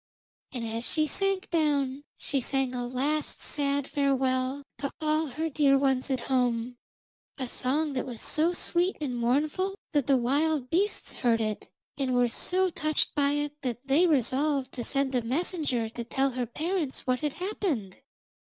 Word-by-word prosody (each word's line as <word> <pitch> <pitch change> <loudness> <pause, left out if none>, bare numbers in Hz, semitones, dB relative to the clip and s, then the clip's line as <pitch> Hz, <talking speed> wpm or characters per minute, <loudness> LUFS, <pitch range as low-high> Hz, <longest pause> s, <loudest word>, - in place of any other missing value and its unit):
And 245 -4 -4
as 225 +1 -3
she 310 -1 +2
sank 390 +5 0
down 290 -4 +1
she 275 -2 -1
sang 270 0 0
a 245 -1 -3
last 285 +5 -1
sad 285 -1 0
farewell 265 -1 0 0.2
to 280 - -2
all 310 0 +1
her 310 +5 -3
dear 285 -2 +3
ones 270 -1 +1
at 260 -2 0
home 245 -2 0 0.6
a 260 -3 -3
song 285 +5 0
that 260 0 -2
was 240 -3 -7
so 320 +3 +4
sweet 350 +1 +1
and 275 -5 -3
mournful 295 +11 0 0.2
that 290 -4 +1
the 275 -2 +5
wild 280 +2 +1
beasts 400 +5 0
heard 235 -2 +2
it, 215 -2 -3 0.3
and 260 -2 0
were 245 0 +4
so 370 +9 +2
touched 310 -2 0
by 285 -1 +2
it 295 0 -1
that 250 -1 -4
they 290 +7 +4
resolved 275 -1 +1
to 245 - -5
send 275 +2 0
a 250 - +2
messenger 265 -2 -1
to 235 +1 -6
tell 270 +3 0
her 250 -1 -3
parents 315 +1 -2
what 255 -1 +1
had 300 -2 -2
happened. 340 - -3
275 Hz, 170 wpm, -28 LUFS, 250-305 Hz, 0.6 s, the